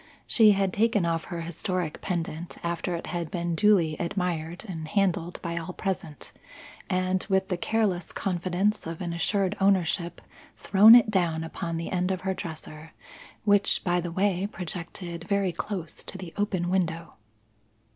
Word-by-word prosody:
She 215 Hz, -3 st, +6 dB
had 195 Hz, -2 st, 0 dB
taken 215 Hz, -3 st, +2 dB
off 165 Hz, -1 st, -1 dB
her 170 Hz, -2 st, -5 dB
historic 170 Hz, 0 st, -3 dB
pendant 170 Hz, -2 st, -4 dB
after 170 Hz, +1 st, -2 dB
it 170 Hz, -, -5 dB
had 170 Hz, -2 st, -3 dB
been 170 Hz, -1 st, -2 dB
duly 175 Hz, -4 st, +3 dB
admired 175 Hz, 0 st, -2 dB
and 160 Hz, -4 st, -5 dB
handled 180 Hz, -1 st, 0 dB
by 170 Hz, -1 st, -3 dB
all 165 Hz, +2 st, -6 dB
present, 175 Hz, -7 st, -4 dB, 0.6 s
and, 185 Hz, 0 st, +1 dB
with 190 Hz, 0 st, +2 dB
the 180 Hz, -, +1 dB
careless 190 Hz, -2 st, 0 dB
confidence 185 Hz, +2 st, -1 dB
of 165 Hz, -1 st, -5 dB
an 175 Hz, -2 st, -3 dB
assured 195 Hz, +3 st, 0 dB
ownership, 180 Hz, -2 st, +2 dB, 0.4 s
thrown 210 Hz, +4 st, +8 dB
it 235 Hz, -3 st, +5 dB
down 170 Hz, -5 st, +1 dB
upon 165 Hz, +1 st, -4 dB
the 165 Hz, -, -4 dB
end 180 Hz, 0 st, 0 dB
of 185 Hz, -1 st, -1 dB
her 190 Hz, 0 st, -1 dB
dresser, 160 Hz, -2 st, -8 dB, 0.5 s
which, 205 Hz, -1 st, +3 dB
by 175 Hz, -1 st, +1 dB
the 175 Hz, 0 st, -4 dB
way, 190 Hz, +1 st, +1 dB
projected 170 Hz, -1 st, -6 dB
very 200 Hz, -2 st, +1 dB
close 175 Hz, -1 st, -5 dB
to -, -, -4 dB
the 180 Hz, -3 st, -8 dB
open 185 Hz, -4 st, -1 dB
window. 170 Hz, -3 st, -1 dB
180 Hz, 155 wpm, -27 LUFS, 170-195 Hz, 0.6 s, thrown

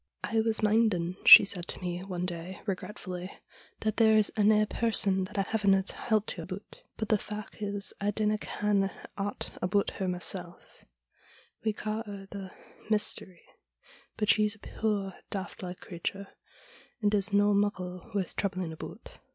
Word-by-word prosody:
' -, -, -45 dB
I 225 Hz, -1 st, +1 dB
was 220 Hz, 0 st, -1 dB
minding,' 205 Hz, -5 st, +2 dB
she -, -, +12 dB
said 180 Hz, -3 st, -1 dB
to -, -, -6 dB
me 180 Hz, 0 st, -4 dB
one 180 Hz, -2 st, -3 dB
day 175 Hz, +1 st, -5 dB
regretfully, 185 Hz, -2 st, -5 dB, 0.3 s
' -, -, -25 dB
that 215 Hz, -1 st, -1 dB
there's 220 Hz, -2 st, +5 dB
ane 215 Hz, 0 st, +4 dB
person 200 Hz, -4 st, +3 dB
that 205 Hz, +3 st, -10 dB
I 195 Hz, -, +3 dB
havena 200 Hz, -2 st, +2 dB
telt 215 Hz, 0 st, -1 dB
ye 170 Hz, -, -6 dB
aboot. 190 Hz, +4 st, -9 dB, 0.2 s
But 220 Hz, -, -3 dB
the 215 Hz, -2 st, +3 dB
fac' 210 Hz, +1 st, -7 dB
is 200 Hz, -1 st, -3 dB
I 200 Hz, -, +1 dB
dinna 210 Hz, 0 st, 0 dB
ken 205 Hz, -2 st, 0 dB, 0.3 s
aught 200 Hz, 0 st, -4 dB
aboot 195 Hz, +2 st, +1 dB
her 190 Hz, -, 0 dB
mysel' 180 Hz, -1 st, -3 dB, 1.0 s
We 220 Hz, -1 st, +1 dB
ca' 215 Hz, +1 st, -3 dB
her 200 Hz, -1 st, -8 dB
the 195 Hz, -2 st, -6 dB, 0.4 s
Mystery. 210 Hz, -4 st, -1 dB, 0.7 s
But 210 Hz, -2 st, 0 dB
she's 210 Hz, +1 st, +4 dB
a -, -, -21 dB
puir, 205 Hz, -3 st, -2 dB, 0.2 s
daft 195 Hz, -1 st, -4 dB
like 180 Hz, -1 st, -7 dB
creature, 195 Hz, +3 st, -5 dB, 0.7 s
and 210 Hz, -2 st, +1 dB
is 205 Hz, 0 st, +1 dB
no 205 Hz, 0 st, +4 dB
muckle 185 Hz, -3 st, -1 dB
worth 190 Hz, -3 st, -1 dB
troubling 185 Hz, -4 st, -2 dB
aboot.' 160 Hz, -, -10 dB
200 Hz, 160 wpm, -29 LUFS, 185-215 Hz, 1.0 s, she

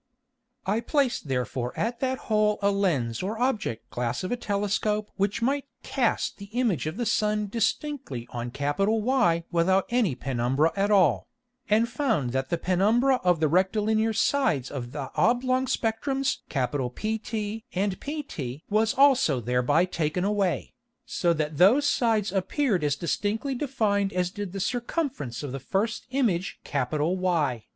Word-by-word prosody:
I 205 Hz, +4 st, +1 dB
placed 265 Hz, -, 0 dB
therefore 125 Hz, -1 st, -2 dB
at 235 Hz, +1 st, -1 dB
that 260 Hz, 0 st, 0 dB
hole 210 Hz, -1 st, +2 dB
a 200 Hz, -, +4 dB
Lens 150 Hz, -, 0 dB
or 205 Hz, +4 st, -3 dB
Object 220 Hz, -, -1 dB
glass 120 Hz, +2 st, -2 dB
of 185 Hz, -, -3 dB
a -, -, +2 dB
Telescope 210 Hz, -1 st, -1 dB
which 200 Hz, +3 st, -1 dB
might 275 Hz, +3 st, +1 dB, 0.2 s
cast 250 Hz, -6 st, 0 dB
the 200 Hz, -, -7 dB
Image 205 Hz, -, +1 dB
of 160 Hz, +5 st, -4 dB
the 240 Hz, -, -1 dB
Sun 210 Hz, -1 st, +1 dB
distinctly 230 Hz, -, -2 dB
on 120 Hz, 0 st, -4 dB
Y 195 Hz, -, +1 dB
without 185 Hz, +3 st, +3 dB
any 230 Hz, -, +2 dB
Penumbra 130 Hz, +4 st, 0 dB
at 200 Hz, +1 st, +1 dB
all, 200 Hz, -2 st, +3 dB, 0.4 s
and 220 Hz, +2 st, +4 dB
found 225 Hz, -, 0 dB
that 130 Hz, +1 st, -2 dB
the 170 Hz, -, 0 dB
Penumbra 215 Hz, +10 st, +3 dB
of 180 Hz, -3 st, +3 dB
the 155 Hz, -, +3 dB
rectilinear 215 Hz, +6 st, +2 dB
Sides 220 Hz, -, +1 dB
of 125 Hz, -4 st, -5 dB
the 135 Hz, -2 st, -5 dB
oblong 255 Hz, +2 st, +2 dB
Spectrums 260 Hz, +4 st, 0 dB
PT 210 Hz, -, -2 dB
and 195 Hz, -1 st, 0 dB
pt 165 Hz, -, -5 dB
was 220 Hz, +1 st, +2 dB
also 265 Hz, -, +4 dB
thereby 125 Hz, +8 st, +2 dB
taken 170 Hz, -1 st, -1 dB
away, 200 Hz, -3 st, 0 dB, 0.3 s
so 175 Hz, -7 st, 0 dB
that 155 Hz, -2 st, -2 dB
those 245 Hz, +11 st, +6 dB
Sides 225 Hz, -9 st, +1 dB
appeared 200 Hz, -, 0 dB
as 145 Hz, -2 st, +1 dB
distinctly 205 Hz, -, -1 dB
defined 215 Hz, -7 st, 0 dB
as 180 Hz, 0 st, 0 dB
did 205 Hz, -2 st, -5 dB
the 195 Hz, -, -5 dB
Circumference 240 Hz, -, -2 dB
of 145 Hz, -, -4 dB
the 135 Hz, -, -4 dB
first 205 Hz, -, -2 dB
Image 220 Hz, -9 st, 0 dB
Y. 150 Hz, -, 0 dB
200 Hz, 145 wpm, -26 LUFS, 150-230 Hz, 0.4 s, those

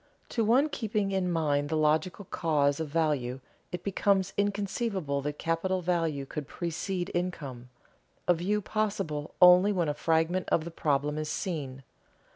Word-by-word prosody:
To 230 Hz, -, 0 dB
one 250 Hz, +7 st, +4 dB
keeping 215 Hz, -7 st, -1 dB
in 185 Hz, -2 st, 0 dB
mind 145 Hz, -3 st, +1 dB
the 160 Hz, -, 0 dB
logical 160 Hz, +6 st, +1 dB
cause 145 Hz, -5 st, +1 dB
of 160 Hz, -, -2 dB
value, 140 Hz, -5 st, 0 dB, 0.3 s
it 175 Hz, -1 st, -5 dB
becomes 195 Hz, -1 st, +1 dB
inconceivable 200 Hz, -, -1 dB
that 145 Hz, +1 st, -4 dB
capital 180 Hz, +3 st, -1 dB
value 165 Hz, -5 st, 0 dB
could 145 Hz, +1 st, -6 dB
precede 175 Hz, +3 st, -3 dB
income, 140 Hz, -9 st, -4 dB, 0.6 s
a 180 Hz, -, +6 dB
view 195 Hz, +5 st, -1 dB
possible 195 Hz, -9 st, -2 dB
only 180 Hz, +3 st, +8 dB
when 175 Hz, -6 st, 0 dB
a -, -, 0 dB
fragment 165 Hz, +4 st, +1 dB
of 160 Hz, -, +2 dB
the 170 Hz, -, -6 dB
problem 150 Hz, -1 st, 0 dB
is 155 Hz, 0 st, -3 dB
seen. 140 Hz, -9 st, -4 dB
170 Hz, 150 wpm, -29 LUFS, 150-190 Hz, 0.6 s, only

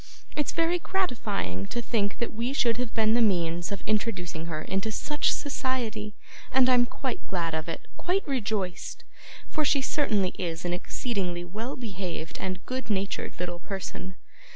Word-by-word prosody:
It's 295 Hz, -, +1 dB
very 335 Hz, +2 st, +3 dB
gratifying 215 Hz, -, 0 dB
to -, -, -2 dB
think 210 Hz, -4 st, +1 dB
that 235 Hz, -, -1 dB
we 235 Hz, +4 st, 0 dB
should 235 Hz, -4 st, +3 dB
have 250 Hz, -2 st, -1 dB
been 220 Hz, -1 st, +4 dB
the 240 Hz, -, +5 dB
means 175 Hz, -5 st, +2 dB
of 200 Hz, -, -3 dB
introducing 190 Hz, -7 st, 0 dB
her 155 Hz, -2 st, -2 dB
into 195 Hz, +3 st, 0 dB
such 295 Hz, +7 st, +2 dB
society, 235 Hz, -7 st, -1 dB, 0.4 s
and 260 Hz, -1 st, +6 dB
I'm 245 Hz, -1 st, +6 dB
quite 260 Hz, +1 st, -3 dB
glad 170 Hz, -3 st, 0 dB
of 160 Hz, +1 st, -1 dB
it 165 Hz, -, -4 dB
quite 365 Hz, +2 st, +1 dB
rejoiced 215 Hz, -9 st, -1 dB, 0.4 s
for 310 Hz, -, +1 dB
she 285 Hz, -1 st, +4 dB
certainly 215 Hz, -10 st, +2 dB
is 170 Hz, -2 st, -2 dB
an 175 Hz, -, +1 dB
exceedingly 180 Hz, -2 st, -1 dB
well 220 Hz, +9 st, -4 dB
behaved 185 Hz, -8 st, -4 dB
and 185 Hz, -1 st, -3 dB
good 255 Hz, -3 st, -3 dB
natured 200 Hz, -3 st, -1 dB
little 175 Hz, -1 st, -2 dB
person. 190 Hz, 0 st, -5 dB
210 Hz, 160 wpm, -29 LUFS, 180-250 Hz, 0.4 s, and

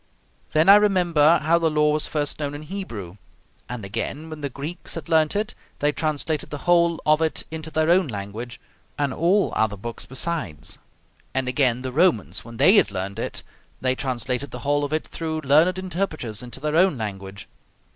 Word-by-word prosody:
Then 155 Hz, +2 st, +3 dB
I 200 Hz, +1 st, +10 dB
remember 175 Hz, -6 st, +4 dB
how 165 Hz, +2 st, +3 dB
the 165 Hz, -1 st, +2 dB
law 150 Hz, 0 st, +2 dB
was 150 Hz, -, +1 dB
first 150 Hz, -1 st, -2 dB
known 145 Hz, -1 st, -3 dB
in 145 Hz, -, -7 dB
Hebrew, 120 Hz, -, -6 dB, 0.5 s
and 125 Hz, -5 st, -5 dB
again, 140 Hz, +10 st, -4 dB
when 155 Hz, -1 st, -7 dB
the 140 Hz, -, -2 dB
Greeks 145 Hz, +7 st, -5 dB
had 165 Hz, 0 st, -7 dB
learnt 160 Hz, +1 st, +3 dB
it, 210 Hz, +1 st, -1 dB, 0.2 s
they 145 Hz, +1 st, +2 dB
translated 155 Hz, 0 st, -2 dB
the 145 Hz, -, -5 dB
whole 170 Hz, -1 st, +3 dB
of 155 Hz, +1 st, +4 dB
it 160 Hz, -1 st, 0 dB
into 160 Hz, 0 st, -5 dB
their 160 Hz, +1 st, +2 dB
own 180 Hz, -1 st, +4 dB
language, 110 Hz, +2 st, -6 dB, 0.4 s
and 145 Hz, -2 st, 0 dB
all 185 Hz, +7 st, +2 dB
other 110 Hz, -2 st, +1 dB
books 115 Hz, +4 st, -7 dB
besides. 130 Hz, -, -2 dB, 0.6 s
And 130 Hz, -1 st, +1 dB
again, 125 Hz, -1 st, +1 dB
the 130 Hz, -, -3 dB
Romans, 160 Hz, -, +2 dB
when 115 Hz, 0 st, -11 dB
they 195 Hz, -, +6 dB
had -, -, +5 dB
learnt 100 Hz, +1 st, -4 dB
it, -, -, -4 dB, 0.4 s
they 130 Hz, 0 st, +2 dB
translated 130 Hz, +1 st, -2 dB
the 125 Hz, -, -8 dB
whole 145 Hz, +1 st, +2 dB
of 145 Hz, -, -3 dB
it 155 Hz, 0 st, -1 dB
through 160 Hz, -1 st, -4 dB
learned 155 Hz, +6 st, +4 dB
interpreters 175 Hz, -, -2 dB
into 125 Hz, +1 st, -8 dB
their 150 Hz, +2 st, -2 dB
own 180 Hz, -3 st, +4 dB
language. 100 Hz, -2 st, -6 dB
150 Hz, 185 wpm, -23 LUFS, 125-165 Hz, 0.6 s, I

